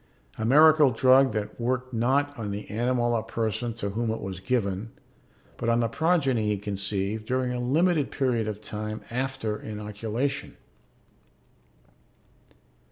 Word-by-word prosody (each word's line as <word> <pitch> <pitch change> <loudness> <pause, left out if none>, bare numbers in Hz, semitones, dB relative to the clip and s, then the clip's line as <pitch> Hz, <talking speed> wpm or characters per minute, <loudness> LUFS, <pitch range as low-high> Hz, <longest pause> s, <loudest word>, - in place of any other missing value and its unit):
A 110 - -1
miracle 150 +3 +6
drug 130 +3 +5
that 105 +1 -4
worked 130 +1 -1
not 135 +5 +1
on 110 -5 -5
the 100 +1 -5
animal 120 +2 +1
or 115 - +1
person 115 +1 -2
to 100 -3 -3
whom 115 +2 -1
it 110 - -2
was 95 -2 -6
given, 100 -1 -1 0.7
but 115 - -1
on 115 0 +3
the 115 - +2
progeny 135 -5 +1
he 105 -1 +1
conceived 100 +1 -2
during 130 0 0
a 125 - -3
limited 150 +4 +2
period 125 -5 0
of 105 -1 -4
time 110 0 -5
after 125 -4 -2
inoculation. 110 +6 -4
115 Hz, 140 wpm, -26 LUFS, 105-130 Hz, 0.7 s, miracle